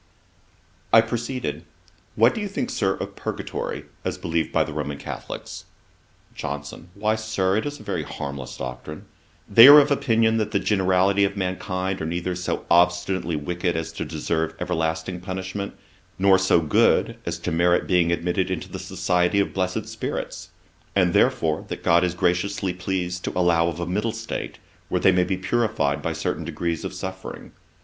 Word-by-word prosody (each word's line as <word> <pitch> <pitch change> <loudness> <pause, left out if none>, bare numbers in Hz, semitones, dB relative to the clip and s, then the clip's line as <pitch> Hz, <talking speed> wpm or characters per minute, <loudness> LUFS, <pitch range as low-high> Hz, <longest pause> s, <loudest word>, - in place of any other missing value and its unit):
I 115 - +8
proceeded: 115 - -3 0.5
'What 115 +3 +5
do 220 - -4
you 205 - -2
think, 195 -10 -3
Sir, 95 0 +1
of - - -6
Purgatory, - - -4 0.2
as - - -2
believed 80 -1 -1
by - - +3
the - - -7
Roman 70 -1 -3
Catholicks?' - - -7 0.7
JOHNSON. 75 +2 -6
'Why, 105 +2 +1
Sir, 110 -4 0
it 110 - -1
is 145 0 -6
a - - -11
very - - -2
harmless 70 -2 -6
doctrine. 65 +5 -7 0.4
They 115 +5 +9
are 145 +1 +12
of 145 0 +5
opinion 115 -4 +2
that 110 -2 0
the - - +1
generality 95 0 +2
of 100 0 0
mankind 95 0 -2
are 80 - -2
neither 90 +2 -2
so 90 +1 -3
obstinately 90 0 +2
wicked 85 +3 -2
as 80 - -3
to - - -4
deserve 80 0 -2
everlasting 80 +1 -2
punishment, 95 +2 -5 0.4
nor 95 0 +5
so 95 -3 +3
good 80 - +3
as 85 0 -2
to 85 +1 -4
merit 85 +2 +3
being 90 -2 +3
admitted 90 +2 0
into 95 -3 -4
the - - -5
society 90 +1 +1
of 100 - 0
blessed 90 -1 -1
spirits; - - -5 0.5
and 90 -3 +3
therefore 80 -1 +2
that - - -6
God 85 +1 +4
is 90 -1 0
graciously 90 +2 0
pleased 90 -1 -3
to - - -3
allow 85 -2 +3
of 85 0 -3
a 85 - -2
middle 105 +6 -1
state, 110 0 -5 0.3
where - - +1
they 95 - +6
may 90 -1 +3
be 95 0 -1
purified 95 -8 0
by - - -2
certain - - -2
degrees 85 -2 -3
of - - -4
suffering. 95 0 -7
90 Hz, 170 wpm, -24 LUFS, 85-100 Hz, 0.7 s, are